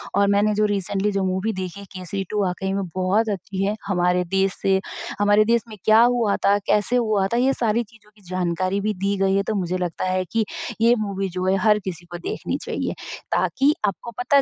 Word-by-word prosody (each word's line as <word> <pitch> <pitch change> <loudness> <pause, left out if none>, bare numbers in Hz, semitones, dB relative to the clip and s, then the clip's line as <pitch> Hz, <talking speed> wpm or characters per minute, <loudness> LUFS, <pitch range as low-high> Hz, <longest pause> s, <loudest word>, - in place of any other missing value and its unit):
और 200 0 +4
मैंने 210 +1 +3
जो 210 +1 +3
रीसेंटली 200 +1 -1
जो 195 -1 0
मूवी 190 +4 -1
देखी, 190 +1 -6
केसरी 185 +2 -3
2,। 210 -1 0
वाक़ई 190 +1 -2
में 200 0 -1
बहुत 185 +1 0
अच्छी 195 0 -3
है। 205 - +1
हमारे 180 -2 +1
देश 195 0 +2
से 190 -1 +3 0.4
हमारे 205 +1 +5
देश 235 +1 +3
में 220 - -9
क्या 215 +1 +6
हुआ 235 -4 +3
था? 200 +1 +3
कैसे 210 +4 +2
हुआ 215 -5 +2
था? 235 - -1
ये 260 +2 +3
सारी 230 -1 +1
चीज़ों 215 -1 -21
की 210 - -22
जानकारी 185 +1 -1
भी 215 +1 0
दी 200 +1 -1
गई 195 0 +2
है, 200 - +2
तो 215 - -2
मुझे 185 -2 -1
लगता 180 0 -3
है 185 0 0
कि 225 -1 +1 0.4
ये 230 +1 +6
मूवी 195 -1 -3
जो 185 +1 -3
है, 190 +1 +3
हर 210 0 +4
किसी 175 -2 -5
को 175 - -5
देखनी 175 - -3
चाहिए, - - -3 0.4
ताकि 280 +2 +2
आपको 205 +4 -4
पता 280 +3 +4
200 Hz, 215 wpm, -23 LUFS, 185-215 Hz, 0.4 s, क्या